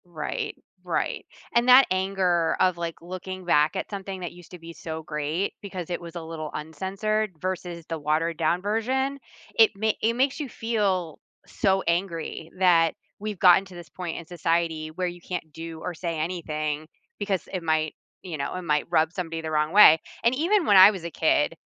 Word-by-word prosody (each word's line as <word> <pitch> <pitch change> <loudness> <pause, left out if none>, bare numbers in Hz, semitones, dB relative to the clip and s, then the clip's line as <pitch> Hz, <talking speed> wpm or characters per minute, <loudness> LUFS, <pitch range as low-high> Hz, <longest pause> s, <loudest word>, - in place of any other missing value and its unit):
Right, 160 -4 -4 0.3
right, - - -2 0.3
and 235 +1 +3
that 255 +2 +9
anger 185 -3 +1
of, 185 -2 +3
like, 170 -1 -3
looking 185 +1 -7
back 155 0 +3
at 190 - -3
something 195 -2 -6
that 175 - -4
used 175 -1 -15
to 180 - -10
be 165 0 -10
so 160 -1 -6
great 150 +5 -2
because 185 -4 -6
it 175 - -2
was 170 0 -10
a 170 - -5
little 160 -1 -6
uncensored 195 +7 -2
versus 175 -2 -4
the 165 -1 -4
watered 155 +3 0
down 170 +2 +1
version, 260 +7 -1 0.4
it 225 -1 +6
ma 220 +2 +1
it 225 +1 +2
makes 265 +4 +1
you 290 -3 -4
feel 200 -9 -1 0.3
so 190 -1 +1
angry 170 -2 -2
that 170 -3 +4 0.2
we've 210 -1 -4
gotten 180 +2 +6
to 190 -2 -13
this 170 -3 -10
point 175 +2 -5
in 170 - -7
society 165 -2 -1
where 180 +3 -2
you 175 0 -7
can't 170 -4 -6
do 165 0 -7
or 180 - -4
say 165 -1 -4
anything 155 -2 -3 0.3
because 200 -3 -2
it 185 - -2
might 155 -1 +1 0.3
you 175 -4 -5
know, 140 0 -3
it 185 - -4
might 150 -4 0
rub 160 -2 +3
somebody 165 -3 -4
the 160 - -4
wrong 155 0 +1
way, 170 -6 +8 0.2
and 235 - +4
even 350 +6 +2
when 205 - +6
I 190 +2 +10
was 190 -5 -7
a 170 - -4
kid, 160 -1 +2
175 Hz, 195 wpm, -26 LUFS, 160-195 Hz, 0.4 s, I